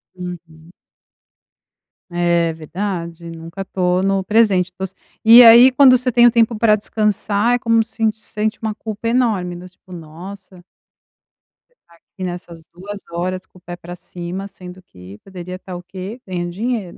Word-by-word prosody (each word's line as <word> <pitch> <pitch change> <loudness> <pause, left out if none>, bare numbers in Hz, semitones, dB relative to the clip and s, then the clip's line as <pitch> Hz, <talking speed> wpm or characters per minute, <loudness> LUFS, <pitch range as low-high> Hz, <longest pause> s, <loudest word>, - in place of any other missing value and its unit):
Uhum. 170 -2 -10 1.4
É 170 -1 +1
verdade, 170 0 -5
nunca 165 +4 -8
tô 180 -1 0
no 195 0 0
presente, 200 -4 +2
tô 180 - -18
s 190 - -10 0.3
e 230 +2 +10
aí, 235 +2 +9
quando 255 -2 +7
você 250 +1 -1
tem 240 0 +5
o 240 - +7
tempo 230 -1 +2
pra 215 -1 +4
descansar, 210 +2 0
é - - -2
como 230 -1 +2
sint 225 -1 -1
sente 215 0 -4
uma 220 -1 -2
culpa 220 +1 -5
enorme, 215 -8 0
né, 180 - -11
do - - -12
tipo 185 - -22
"Nossa" 180 +3 -11 1.1
você - - -37
tá 170 - -22
aqui 185 +3 -12
nessas 175 -2 -7
2 200 +3 -9
horas 185 +2 -3
com - - -22
o 180 - -19
pé 175 0 -8
pra 175 0 -10
cima, 180 +2 -7
sendo 185 -1 -12
que 95 - -14
poderia 185 -2 -9
estar 185 0 -9
o 175 - -8
quê? 190 +6 -8
Ganhando 175 -2 -4
dinheiro, 210 -1 -4
185 Hz, 170 wpm, -19 LUFS, 175-215 Hz, 1.4 s, e